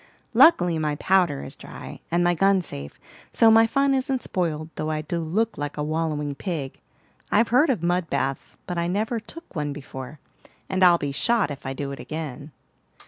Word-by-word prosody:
"Luckily, 175 - +5
my 150 -1 0
powder 180 -4 +2
is - - -7
dry - - -10
and 175 +1 +2
my 175 0 +3
gun 195 +1 +3
safe; 70 - -7 0.3
so 225 -1 +5
my 225 0 +6
fun 275 +3 +2
isn't 260 -1 -1
spoiled, 160 -3 -2
though 155 - -3
I 155 -1 -1
do 170 +3 -3
look 195 +7 -1
like 145 0 -4
a 150 - -1
wallowing 150 -2 -1
pig. 145 -3 -5 0.5
I've 225 +2 +3
heard 260 +7 +4
of 225 -11 0
mud 175 -1 0
baths, 135 0 -2
but 175 -1 -3
I 170 - 0
never 215 +6 -1
took 330 - -12
one 150 -2 -2
before, 135 0 -9 0.5
and 190 0 +1
I'll 175 -1 +7
be 145 -3 -3
shot 215 +4 +1
if 140 -1 -7
I 135 - -2
do 140 +1 -4
again." 150 0 -6
170 Hz, 190 wpm, -24 LUFS, 150-200 Hz, 0.5 s, I'll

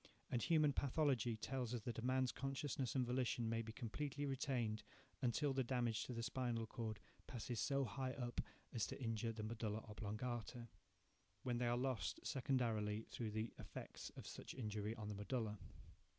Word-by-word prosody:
And 120 - +2
human 155 -2 +5
pathology 135 -5 +3
tells 125 +1 -1
us 120 - -2
that 115 +1 -2
a - - -3
man's 130 0 +3
consciousness 135 -1 -1
and 130 -2 +4
volition 125 -1 +2
may 115 0 +2
be 110 -1 -4
completely 140 +5 -2
retained 125 -5 +1 0.4
until 135 +3 +3
the 135 0 +3
damage 120 -3 +2
to 125 - -3
the 115 - -1
spinal 120 -2 +1
cord 110 -2 -3 0.3
passes 120 -2 -2
so 140 -1 +3
high 130 +3 -1
up 120 -2 -1 0.3
as 115 - +2
to - - -5
injure 115 -2 +1
the 110 -1 -4
medulla 110 -1 -1
oblongata, 115 +3 -3 0.7
when 120 -2 +1
they 125 - +3
are 120 0 +3
lost, 130 -1 +1
secondarily, 115 -5 +2
through 115 -3 -1
the 110 +2 -1
effects - - -6
of - - -6
such - - -6
injury 105 -3 -1
on 110 -3 -4
the 105 - -1
medulla. 105 0 -1
120 Hz, 170 wpm, -44 LUFS, 110-130 Hz, 0.7 s, human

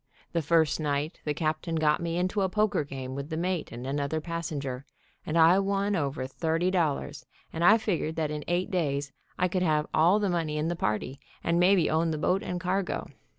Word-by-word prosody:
The 170 - 0
first 160 0 +2
night 150 +1 -2
the 150 - 0
captain 160 +2 -1
got 155 -1 +2
me 170 0 -2
into 185 +3 0
a 190 - +1
poker 210 -4 +1
game 135 -2 -6
with 140 +2 -5
the 160 - -3
mate 175 -1 -2
and 120 +2 -7
another 140 +3 -1
passenger, 150 -5 -4 0.4
and 155 - 0
I 165 +3 +6
won 200 +1 0
over 140 -5 -2
thirty 165 +6 0
dollars, 165 -6 -1 0.3
and 165 - -2
I 215 +5 +7
figured 180 -7 -2
that 155 -2 -1
in 150 -1 -4
eight 175 +1 0
days 140 -6 -1 0.3
I 180 - +2
could 185 0 -1
have 155 -3 +2
all 170 +6 +5
the 210 -1 0
money 165 -4 -1
in 155 +2 0
the 175 - -1
party, 125 -1 -2 0.2
and 170 +1 +1
maybe 180 -1 +4
own 160 +1 +1
the 155 - -1
boat 180 +5 +1
and 180 - -3
cargo. 185 +1 -2
165 Hz, 205 wpm, -28 LUFS, 150-180 Hz, 0.4 s, I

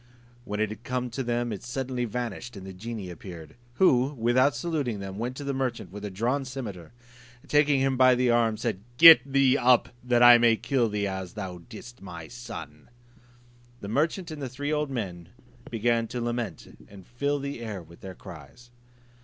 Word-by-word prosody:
When 105 0 -4
it 110 -1 +1
had 110 +2 -9
come 125 +1 -2
up 125 - -7
to 135 - -3
them 120 -1 -1
it 100 - -7
suddenly 125 0 -3
vanished, 120 0 -5
and 95 - -9
the 95 - -8
genie 105 -1 -6
appeared; 85 -3 -10 0.2
who, 135 -5 +3
without 130 +3 +2
saluting 135 -5 -2
them, 95 0 -7
went 125 +3 -3
to 145 - -6
the 140 0 -2
merchant 125 -8 -3
with 105 +1 -9
a 105 - -3
drawn 120 +9 -1
cimeter, 115 - -7 0.5
and - - -15
taking 145 -1 +4
him 135 -1 +1
by 130 0 +6
the 125 0 +2
arm, 115 -2 +2
said, 110 -4 -3 0.2
"Get 165 +1 +11
thee 135 0 +4
up, 125 -1 +4
that 120 -1 +3
I 120 0 +9
may 115 -1 +5
kill 120 +1 0
thee, 105 -1 -1
as 95 -2 -5
thou 95 -4 -6
didst 120 +2 -11
my 85 -4 -9
son." 80 - -9 0.9
The 100 - -6
merchant 160 - 0
and 155 -2 -7
the 135 - -4
three 145 +4 -3
old 150 -1 -1
men 95 -10 -5 0.4
began 115 0 +1
to 125 - -5
lament 120 -5 -4
and 95 -2 -14
fill 140 +4 -1
the 140 -2 -5
air 105 -6 -6
with 85 +1 -17
their 95 -1 -8
cries. 90 - -13
120 Hz, 195 wpm, -27 LUFS, 100-130 Hz, 0.9 s, Get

